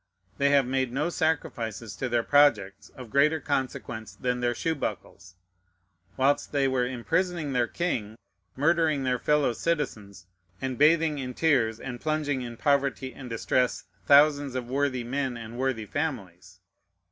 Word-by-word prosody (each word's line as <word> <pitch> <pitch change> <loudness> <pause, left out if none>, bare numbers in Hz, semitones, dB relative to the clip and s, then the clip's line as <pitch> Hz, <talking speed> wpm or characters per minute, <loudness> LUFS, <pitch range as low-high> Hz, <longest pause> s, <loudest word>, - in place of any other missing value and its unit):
They 140 0 +3
have 140 -2 +4
made 130 -1 -1
no 145 +6 -1
sacrifices 115 - -2
to 130 - -2
their 120 -1 +1
projects 130 -10 +3
of 125 -4 -10
greater 150 +3 +3
consequence 125 -7 -3
than 125 +2 -2
their 120 0 0
shoe 165 - -1
buckles, 90 - -6 0.8
whilst 140 +2 +1
they 140 -2 +2
were 130 -2 +1
imprisoning 160 +4 -1
their 120 -2 +2
king, 115 -10 -3 0.4
murdering 155 -1 +2
their 125 -1 0
fellow 150 -4 +2
citizens, 110 - -3 0.3
and 130 +1 -3
bathing 155 +2 +3
in 125 -2 -5
tears 125 -9 +2
and 125 -2 -7
plunging 150 -3 -1
in 120 -2 -7
poverty 140 -2 0
and 125 +1 -9
distress 125 +2 0 0.2
thousands 145 -2 +5
of 125 -2 -3
worthy 130 -1 -1
men 130 0 -2
and 115 +1 -8
worthy 130 -4 -1
families. 95 - -5
130 Hz, 145 wpm, -27 LUFS, 120-145 Hz, 0.8 s, thousands